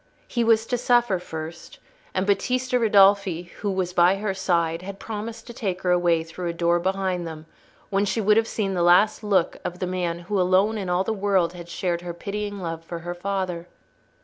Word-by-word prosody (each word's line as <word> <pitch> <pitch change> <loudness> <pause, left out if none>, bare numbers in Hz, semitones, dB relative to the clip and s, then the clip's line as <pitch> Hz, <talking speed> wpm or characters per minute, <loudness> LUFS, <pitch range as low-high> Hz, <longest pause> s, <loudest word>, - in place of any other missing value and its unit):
He 235 - 0
was 225 -1 +3
to 245 +1 -1
suffer 240 -6 +3
first, 160 -1 -8 0.4
and 185 +1 +1
Battista 250 +5 +1
Ridolfi, 195 -5 +4
who 205 - -2
was 185 -2 -2
by 180 +1 +5
her 200 0 -2
side, 170 -3 0
had 195 +1 -7
promised 220 +2 -6
to 240 - -9
take 190 -6 -3
her 180 - +2
away 175 -2 +3
through 170 +2 -6
a - - -2
door 170 0 +2
behind 185 -1 -1
them 160 -1 -8 0.5
when 200 +1 +2
she 200 +3 -1
would 210 0 +4
have 225 0 +3
seen 200 -4 -2
the 180 - 0
last 180 +6 +4
look 195 -5 +1
of 175 - -4
the 185 - -2
man 180 -2 -2
who 190 +2 -1
alone 190 +4 +2
in 190 -3 -4
all 180 +1 +2
the 220 - -1
world 195 -4 +1
had 175 -1 -10
shared 175 -1 -2
her 175 -1 -6
pitying 205 +2 -4
love 165 -3 -5
for 170 +1 -6
her 175 - -3
father. 180 -2 -3
185 Hz, 205 wpm, -24 LUFS, 175-205 Hz, 0.5 s, by